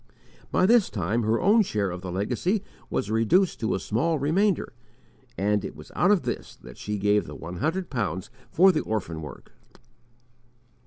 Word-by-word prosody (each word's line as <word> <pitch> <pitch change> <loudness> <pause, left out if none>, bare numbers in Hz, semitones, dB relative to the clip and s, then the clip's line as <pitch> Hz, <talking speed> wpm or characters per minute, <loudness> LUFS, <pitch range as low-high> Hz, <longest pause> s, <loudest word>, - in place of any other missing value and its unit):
By 185 - +3
this 230 0 +5
time 105 +4 -1
her 110 +1 +1
own 210 +5 +5
share 105 - -1
of 90 0 -6
the 90 -1 -5
legacy 125 - -1 0.3
was 105 - -2
reduced 115 - +2
to 110 - 0
a - - -2
small 155 +13 0
remainder, 175 +7 +1 0.6
and 105 +2 +1
it - - -6
was 75 0 -12
out 180 - +3
of 205 -4 +4
this - - -4
that - - -14
she 105 0 -3
gave 105 +1 +2
the - - -8
one 85 +2 -7
hundred 170 - -2
pounds 100 - -3 0.2
for 190 +4 +6
the 155 - 0
orphan 90 -7 -3
work! 75 - -10
115 Hz, 175 wpm, -26 LUFS, -, 0.6 s, for